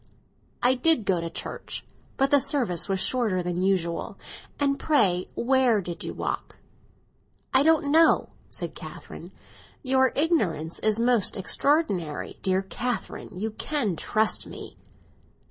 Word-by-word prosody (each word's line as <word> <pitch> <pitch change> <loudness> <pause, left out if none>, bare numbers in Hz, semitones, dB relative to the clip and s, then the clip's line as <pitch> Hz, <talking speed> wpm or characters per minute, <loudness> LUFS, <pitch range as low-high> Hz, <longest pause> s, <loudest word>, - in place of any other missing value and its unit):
"I 250 +1 +5
did 260 -2 +2
go 180 -3 +1
to 165 - -4
church; - - -5 0.3
but 270 +1 +2
the 285 - +6
service 255 - 0
was 190 -1 0
shorter 215 -6 +2
than 180 0 -2
usual. 180 -3 -1 0.4
And 280 -1 +1
pray, 195 - +2
where 255 -3 +3
did 175 -3 -6
you - - -4
walk?" - - -4 1.0
"I 265 - +6
don't 300 -1 +3
know!" 325 +1 +4 0.2
said - - -5
Catherine. - - -10 0.5
"Your 260 -1 +3
ignorance 205 - 0
is 215 0 +2
most 235 -3 +2
extraordinary! 195 - 0
Dear 190 0 +1
Catherine, 245 +5 -4
you 220 +4 -3
can 220 - -1
trust 215 +6 0
me." - - -9
230 Hz, 130 wpm, -26 LUFS, 185-275 Hz, 1.0 s, the